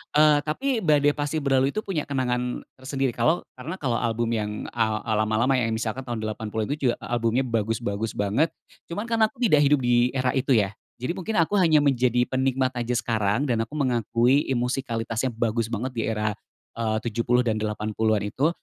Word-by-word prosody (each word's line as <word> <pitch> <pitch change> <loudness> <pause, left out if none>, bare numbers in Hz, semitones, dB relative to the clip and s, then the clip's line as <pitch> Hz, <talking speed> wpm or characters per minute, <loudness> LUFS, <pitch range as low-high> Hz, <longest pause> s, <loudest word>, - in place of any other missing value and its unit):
Eee, 150 -1 +6
tapi, 230 - -1
Badai 145 -5 +3
Pasti 145 +1 -3
Berlalu 135 +2 +2
itu 215 - -1
punya 170 -7 -3
kenangan 125 -2 -1 0.2
tersendiri, 135 -1 -1
kalau 155 +10 +1 0.2
karena 165 +9 -5
kalau 125 -9 -1
album 115 0 -1
yang 105 -2 -1 0.2
a 110 -2 0
eee, 110 -2 -1
lama-lama 110 +5 +2
ya, 115 - 0
misalkan 115 +3 -3
tahun 115 -2 -3
80 110 0 -3
itu 145 -2 0
juga - - +1
albumnya 120 +2 0
bagus-bagus 115 -2 -2
banget. 105 +11 +1 0.3
Cuman 200 +6 -4
karena 230 -2 +2
aku - - -21
tidak 170 -11 +5
hidup 140 -2 +3
di 120 +1 +3
era 130 -1 +1
itu 130 0 +2
ya, 105 -3 +2 0.3
jadi 125 +6 -2
mungkin 190 +5 -4
aku 200 +5 0
hanya 160 -4 +5
menjadi 125 -3 +2
penikmat 130 0 0
aja 120 +1 -1
sekarang, 110 0 0
dan 125 -6 0
aku 150 - -10
mengakui 125 0 +2
i 135 - 0
musikalitasnya 120 -1 -1
bagus 115 -1 0
banget 115 +3 -3
di 115 -4 -2
era, 105 -1 0 0.4
eee, 110 -1 -1
70 120 +2 +1
dan 110 -3 0
80-an 110 0 0
itu. 145 - +1
125 Hz, 185 wpm, -25 LUFS, 115-140 Hz, 0.4 s, Eee